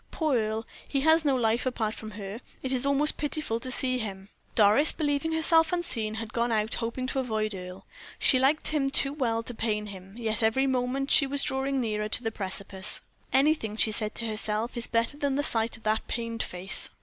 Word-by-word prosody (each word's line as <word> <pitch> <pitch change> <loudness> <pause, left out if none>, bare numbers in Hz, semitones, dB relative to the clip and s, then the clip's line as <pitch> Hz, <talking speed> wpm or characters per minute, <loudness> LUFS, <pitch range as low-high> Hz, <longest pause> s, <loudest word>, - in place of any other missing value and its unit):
"Poor 310 -5 0
Earle! 220 -1 -1 0.2
he 275 - 0
has 320 +2 +4
no 280 -3 +2
life 230 -1 +1
apart 220 -4 -1
from 220 - -8
her; 205 +3 -7 0.2
it 260 - -2
is 260 +1 0
almost 280 +2 +1
pitiful 295 -6 -2
to 255 - -6
see 255 0 0
him." 195 -3 -5 0.3
Doris, 220 +8 +6
believing 295 +1 -1
herself 320 0 +5
unseen, 240 -12 0
had 225 -1 -6
gone 235 0 0
out 215 0 0
hoping 235 +2 -2
to 265 +1 -2
avoid 215 -4 -1
Earle. 180 0 -9 0.3
She 260 - +4
liked 275 +4 +2
him 290 -3 0
too 275 0 +2
well 230 -6 -1
to 245 - -3
pain 215 -2 -1
him, 195 -1 -10
yet 225 -1 -2
every 225 +5 +2
moment 265 +1 -1
she 280 - +6
was 280 +1 0
drawing 270 +1 0
nearer 215 -3 -2
to 245 - +3
the 225 - -1
precipice. 190 -1 -2 0.3
"Anything," 265 -6 +2
she 220 - +2
said 215 0 0
to 230 - -1
herself, 215 +1 -2
"is 235 -1 0
better 230 +4 0
than 285 -2 -1
the 290 - 0
sight 225 -3 +1
of 225 - -20
that 215 0 0
pained 230 -1 -3
face." 180 +2 -1
235 Hz, 210 wpm, -27 LUFS, 215-275 Hz, 0.3 s, Doris